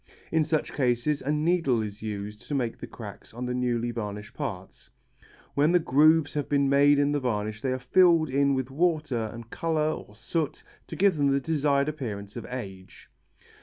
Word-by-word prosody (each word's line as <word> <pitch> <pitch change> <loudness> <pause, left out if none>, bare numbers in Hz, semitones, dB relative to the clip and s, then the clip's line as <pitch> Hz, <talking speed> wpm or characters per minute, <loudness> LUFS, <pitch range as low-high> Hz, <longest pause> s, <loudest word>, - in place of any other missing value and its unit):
In 160 -1 +3
such 155 0 -1
cases 130 +2 +1
a 140 - -1
needle 150 -6 +2
is 105 0 -7
used 105 -1 -6
to 145 - -2
make 120 -4 -2
the - - -7
cracks - - -10
on 125 +1 -4
the 125 - -2
newly 120 -1 0
varnished 105 0 -6
parts. 100 -11 -6 0.6
When 150 +4 +3
the - - +7
grooves 155 0 +4
have 145 -2 -2
been 140 -1 +2
made 140 +1 +5
in 145 0 +2
the 145 - +1
varnish 110 -4 -2
they 130 - -1
are 130 - 0
filled 165 +5 +4
in 140 0 +3
with 130 0 -3
water 155 -6 0
and 115 0 -10
colour 155 -2 0
or 105 - -8
soot 145 +8 -3 0.2
to - - -7
give 195 -4 +3
them 145 -1 +2
the 140 0 +3
desired 140 -1 +1
appearance 105 -10 -5
of - - -6
age. 95 -7 -8
135 Hz, 190 wpm, -27 LUFS, 115-150 Hz, 0.6 s, the